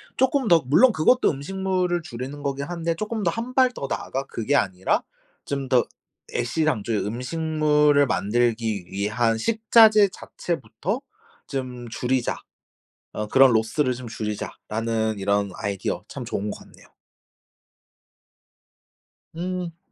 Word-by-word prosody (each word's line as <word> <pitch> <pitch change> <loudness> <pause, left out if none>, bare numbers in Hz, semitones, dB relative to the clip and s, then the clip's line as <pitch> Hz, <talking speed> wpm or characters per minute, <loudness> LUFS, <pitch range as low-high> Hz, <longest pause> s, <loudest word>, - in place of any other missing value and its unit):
쪼끔 265 -1 +2
더 170 -5 +5
물론 195 - +6
그것도 245 +11 +4
음식물을 180 +3 -1
줄이는 135 -1 -7
거긴 140 0 -2
한데 170 0 -2
쪼끔 215 +3 -3
더 175 - +3
1 235 +5 -5
발 255 -1 +4
더 140 - -5
나아가 135 +2 -3
그게 130 +2 -1
아니라 95 -8 +1 0.4
좀 140 -2 -3
더 125 -3 +4 0.5
'애시당초 120 -4 0
음식물을 150 +6 +2
만들기 115 -3 0
위한 110 +4 0
식자재 220 - +5
자체부터 185 +8 -4 0.5
좀 125 -3 -5
줄이자. 125 +1 -1 0.8
어 105 - -3
그런 130 +3 +6
로스를 115 +5 +1
좀 125 0 -8
줄이자.'라는 110 0 -3
이런 100 0 0
아이디어 100 -2 -3
참 - - -7
좋은 105 +1 -3
것 - - -7
같네요. - - -18 2.5
음. 175 -1 -4
135 Hz, 255 characters per minute, -24 LUFS, 115-175 Hz, 2.5 s, 물론